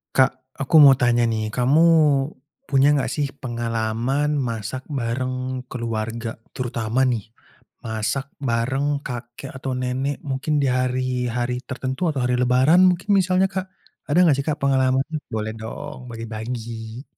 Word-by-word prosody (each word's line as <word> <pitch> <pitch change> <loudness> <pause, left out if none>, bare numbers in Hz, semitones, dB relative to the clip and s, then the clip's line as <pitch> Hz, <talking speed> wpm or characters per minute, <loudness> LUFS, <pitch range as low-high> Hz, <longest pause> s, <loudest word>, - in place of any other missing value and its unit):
Kak, 130 0 +3 0.2
aku 135 +4 0
mau 140 - +10
tanya 120 -1 +3
nih, 110 -2 0
kamu 130 +6 +3 0.9
punya 140 +1 +4
enggak 145 -3 +1
sih 145 -2 -1
pengalaman 120 +4 -1
masak 115 +3 -4
bareng 130 0 -2
keluarga 115 -1 -3 0.2
terutama 120 -1 -2
nih, 110 -4 -2 0.5
masak 110 +4 -2 0.2
bareng 135 +5 0
kakek 120 +1 -7
atau 130 0 -4
nenek 130 +3 -2
mungkin 140 +3 0
di 140 - +2
hari-hari 125 -1 -1
tertentu 130 +2 -4
atau 140 - -3
hari 125 - +1
Lebaran 130 +8 +5
mungkin 180 +2 -4
misalnya 185 +1 +2
Kak, 190 -1 -4 0.4
ada 150 +4 +3
enggak 170 -6 +5
sih, 140 - -1
Kak 150 -1 -1
pengalamannya? 135 +2 +1
Boleh 110 0 -2
dong 125 +3 -8
bagi-bagi. 115 +1 -6
125 Hz, 135 wpm, -22 LUFS, 115-140 Hz, 0.9 s, mau